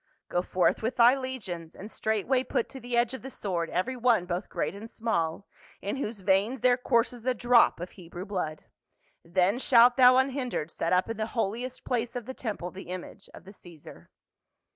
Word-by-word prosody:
" - - -51
Go 175 - +1
forth 180 0 +1
with 225 +3 -2
thy 240 +2 +6
legions, 200 -12 -6
and 210 +3 -9
straightway 220 +4 0
put 235 - -1
to 270 - -9
the 245 -1 -3
edge 240 +1 +2
of 260 - -6
the 265 - -7
sword 175 -9 -3
every 185 +9 -1
one 235 -6 +2
both 180 +2 -4
great - - -2
and 210 +3 -9
small, 195 -7 -2 0.3
in 205 +7 -3
whose 220 -6 -4
veins 200 +6 +1
there 250 -1 +5
courses 240 -1 0
a 255 - +2
drop 240 -5 +4
of 175 +1 -6
Hebrew 175 0 -9
blood, 180 -6 -4 0.6
then 185 +6 +1
shalt 245 -1 +6
thou 255 -1 +7
unhindered 260 - -1
set 165 - -2
up 180 0 +3
in 225 -1 -4
the 220 0 -2
Holiest 235 +4 -2
Place 240 -1 -2
of 245 -3 -4
the 260 - -6
temple 205 -8 -5
the 190 - -10
image 185 -1 -8
of - - -13
the 195 +2 -13
Caesar." 170 -6 -14
225 Hz, 200 wpm, -28 LUFS, 185-250 Hz, 0.6 s, thou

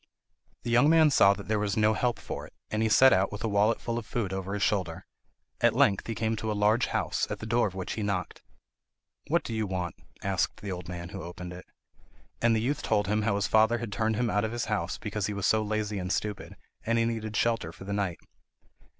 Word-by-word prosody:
The 120 - -3
young 125 +5 +5
man 160 -2 +6
saw 100 -6 +6
that 100 - -9
there 110 0 +1
was 105 -1 -1
no 110 0 +4
help 120 +2 0
for - - -6
it, - - -22 0.2
and 110 - 0
he 110 - +2
set 130 +4 +7
out 95 +1 +2
with 105 - -6
a - - +1
wallet 105 +2 +2
full 115 -1 -2
of 115 - -9
food 105 -6 -2
over 95 +1 -3
his 100 - -1
shoulder. 95 -6 -1 0.6
At - - +4
length 100 -2 +3
he 115 - -3
came 110 0 0
to 110 +1 -2
a 105 - -2
large 105 +4 +3
house, - - -1
at - - -3
the - - -8
door 115 +1 +2
of 95 - -8
which 95 -1 -4
he 110 - -4
knocked. 100 -3 -3 0.9
"What - - +2
do - - -5
you 110 -1 -1
want?" 90 -2 -3 0.3
asked - - -1
the 100 - -4
old 90 -2 -6
man 85 -1 -6
who 95 0 -7
opened 90 +1 -7
it. 90 - -11 0.7
And 115 -1 +4
the 110 - +1
youth 140 +5 -1
told 105 -2 +1
him 105 +2 +1
how 105 -1 +1
his 100 0 0
father 110 +2 +4
had 115 -3 -5
turned 110 +1 0
him 120 +2 0
out 105 - +1
of 110 - -1
his 120 - -2
house 100 -5 -2
because 105 -1 -3
he 105 - -3
was 100 -2 -2
so 110 - +3
lazy 105 -1 -2
and 90 0 -3
stupid, 105 0 -3 0.3
and 115 +1 +1
he 115 - +3
needed 110 -2 -3
shelter 115 -8 +1
for 90 - -12
the 100 +1 -4
night. 100 -5 -1
105 Hz, 250 wpm, -28 LUFS, 100-115 Hz, 0.9 s, set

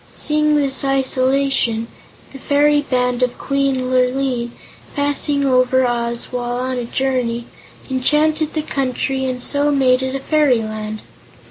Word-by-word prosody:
Seeing 300 0 +1
this 275 -2 +3
isolation, 265 -3 +1 0.5
the 270 - -9
fairy 290 +2 +2
band 250 -3 -1
of 250 -1 0
Queen 275 -2 -1
Lurline, 255 -1 0 0.5
passing 285 0 0
over 255 0 +3
Oz 235 -1 -2
while 245 -1 -3
on 255 0 -2
a 240 - -4
journey, 240 -2 -1 0.4
enchanted 300 +4 +1
the 310 - -1
country 265 -1 -2
and 250 -1 -3
so 285 0 +1
made 260 -3 +3
it 260 0 -3
a - - -2
Fairyland. 220 -8 0
260 Hz, 130 wpm, -18 LUFS, 250-280 Hz, 0.5 s, this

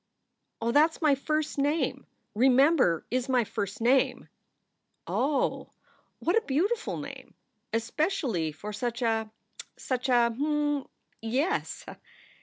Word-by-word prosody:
"Oh, 230 +1 0
that 300 +5 +5
s - - -16
my 300 -2 +5
first 305 +2 -1
name! 290 +4 0 0.3
Remember 255 - +4
is 255 +1 -1
my 250 -2 +3
first 200 0 -4
name." 255 +3 +2 0.8
"Oh! 280 +2 0 0.5
What 345 - 0
a 455 - +4
beautiful 405 - -1
name! - - -9 0.4
Especially 230 - -1
for 205 +8 -8
such 240 +3 -3
a 225 -1 0 0.5
such 255 0 -2
a 240 -2 +4
Mmm, 295 0 0 0.3
yes." 270 - -1
260 Hz, 115 wpm, -28 LUFS, 230-295 Hz, 0.8 s, that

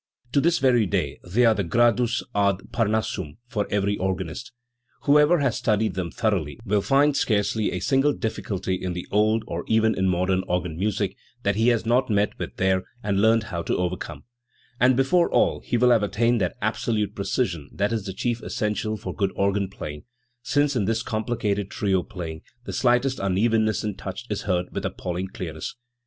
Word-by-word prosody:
To 140 - +3
this 170 +2 +3
very 120 -5 +3
day 75 -7 -1
they 110 +8 +2
are 115 - +6
the 100 - -1
Gradus 120 +5 +2
ad 100 -2 0
Parnassum 110 -8 -1
for 105 -5 -2
every 100 0 0
organist. 95 +6 -3 0.5
Whoever 150 +4 +5
has 135 -5 +1
studied 105 -2 +1
them 90 -2 -3
thoroughly 95 -7 -1
will 105 -1 +2
find 140 +5 +3
scarcely 105 -2 +1
a - - -2
single 135 +7 +3
difficulty, 100 -6 -3
in 90 -1 -2
the 90 - -5
old 110 +2 +2
or 85 -3 -4
even 110 0 +3
in 95 0 +1
modern 90 +1 +1
organ 90 -2 -1
music 100 +1 -1 0.3
that 100 -1 +1
he 110 +2 +2
has 120 -2 +2
not 125 +3 +2
met 105 -1 +1
with - - -5
there 95 0 +2 0.2
and 100 -1 +1
learned 110 +1 +4
how 85 - -1
to - - -1
overcome; 90 -4 -3 0.6
and 130 +1 +5
before 170 +6 +3
all - - +2
he 120 - -1
will 125 +1 +4
have 115 -3 +5
attained 115 +3 +1
that 90 0 -1
absolute 110 -1 0
precision 95 - -2
that 100 +3 -1
is 110 -3 -2
the 95 - -4
chief 120 +3 -2
essential 110 0 -2
for - - -6
good 100 -2 0
organ 100 0 +1
playing, 75 -6 -8 0.4
since 145 +2 +1
in 105 -5 +1
this 115 +2 0
complicated 110 -3 -1
trio 95 -3 0
playing 85 -5 -7 0.2
the - - -6
slightest 125 +1 +2
unevenness 110 +2 +1
in 105 -1 -2
touch 100 +4 -7
is 105 - -1
heard 90 -1 +1
with - - -3
appalling 90 +1 -3
clearness. 80 -5 -6
105 Hz, 185 wpm, -24 LUFS, 95-115 Hz, 0.6 s, are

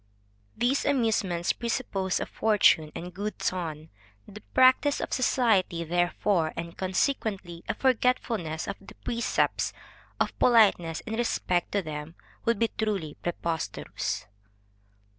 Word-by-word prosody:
_ - - -38 0.5
These 255 +4 +2
amusements 220 -10 +1
presuppose 220 -6 -1
a - - -2
fortune, 195 -8 +3
and 180 +1 -6
good 205 +3 -4
ton; 160 -4 -3 0.4
the 210 +1 -11
practice 260 +3 +5
of - - -3
society, 220 -9 +2
therefore, 175 0 +1
and 170 0 -6
consequently 190 -3 -1
a - - 0
forgetfulness 230 -10 0
of - - -4
the 195 - -13
precepts 235 0 0 0.5
of - - -1
politeness 200 -9 +4
in 225 - -6
respect 180 -7 0
to 200 -1 +1
them, 155 +1 -6 0.3
would 230 -1 +2
be 230 +2 +1
truly 200 -9 -1
preposterous. 170 -1 -3
195 Hz, 125 wpm, -28 LUFS, 170-230 Hz, 0.5 s, practice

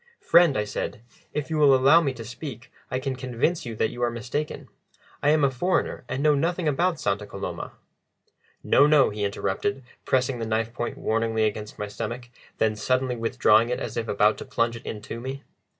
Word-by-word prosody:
"Friend," 170 -5 +5
I 105 - +1
said, 105 +1 -5 0.3
"if 150 +1 -4
you 155 - 0
will 140 -3 +6
allow 140 +6 +6
me 140 -5 0
to 115 -2 -8
speak, 125 +1 -8 0.2
I 130 - -1
can 130 0 -3
convince 130 +5 -1
you 115 - -5
that 110 - 0
you 120 - -8
are 120 - +2
mistaken. 120 +6 -4 0.5
I 145 - +3
am 150 -1 +4
a 140 - +4
foreigner, 150 0 -1
and 135 - -2
know 150 -1 +5
nothing 165 +4 0
about 170 +4 +1
Santa 100 +1 -1
Coloma." 100 - -6 0.9
"No, 145 - +5
no," 150 -5 +5
he 105 0 -4
interrupted, 100 +7 -2 0.2
pressing 130 -1 +1
the 115 - -3
knife 110 +1 -1
point 120 0 -4
warningly 110 0 0
against 105 0 -2
my 105 - -4
stomach, 115 +3 -6 0.3
then 110 -1 +1
suddenly 130 +3 0
withdrawing 115 -1 +3
it 125 - -1
as 115 - -5
if 115 -1 -2
about 105 +1 +2
to - - -7
plunge 115 0 0
it 115 - -10
intome. 120 +5 -6
125 Hz, 195 wpm, -25 LUFS, 110-140 Hz, 0.9 s, will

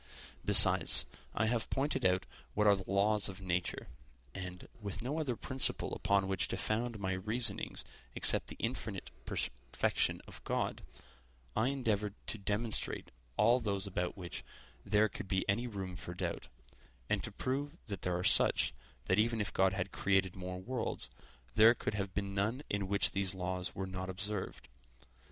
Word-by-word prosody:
Besides, - - +7 0.3
I 110 - +2
have 115 0 0
pointed 135 -7 +1
out 90 0 +1 0.3
what 105 - +3
are 100 -1 +7
the 95 -1 -7
laws 100 +1 +4
of 95 0 -8
nature; 90 -2 -2 0.5
and, 90 -2 -7
with 100 +1 -4
no 145 +6 -1
other 135 -6 -1
principle 130 +3 -1
upon 100 -1 +2
which 95 -1 +1
to - - -3
found 115 +1 -1
my 95 -2 -1
reasonings 110 +3 -2 0.3
except - - +4
the - - -5
infinite - - -3
perfection 65 +2 0
of - - -10
God, - - -1 0.7
I 110 +3 +3
endeavored 110 -7 0
to 110 - -3
demonstrate 105 +3 -2 0.3
all 115 +4 +5
those 100 -4 -1
about 90 -1 -2
which 85 -4 -6 0.4
there 105 +2 +4
could 100 - -7
be 95 -1 0
any 115 +5 +1
room 95 -5 -5
for 90 -1 -7
doubt, - - -3 0.6
and - - 0
to - - -4
prove 145 +5 -3
that 100 -4 -5
they - - 0
are 90 0 -1
such, - - +4 0.3
that 95 +2 +2
even 115 +1 +2
if 105 - -2
God 95 0 +3
had 95 0 -2
created 95 -2 +1
more 90 -1 -5
worlds, 120 +4 -3 0.4
there 110 +2 +7
could - - -3
have 100 -2 -3
been 100 -1 -2
none 110 +8 0
in 100 -1 0
which 100 +1 +2
these 95 -1 -1
laws 90 0 -3
were 95 - -2
not 95 0 -5
observed. 95 +2 -4
100 Hz, 165 wpm, -34 LUFS, 95-110 Hz, 0.7 s, Besides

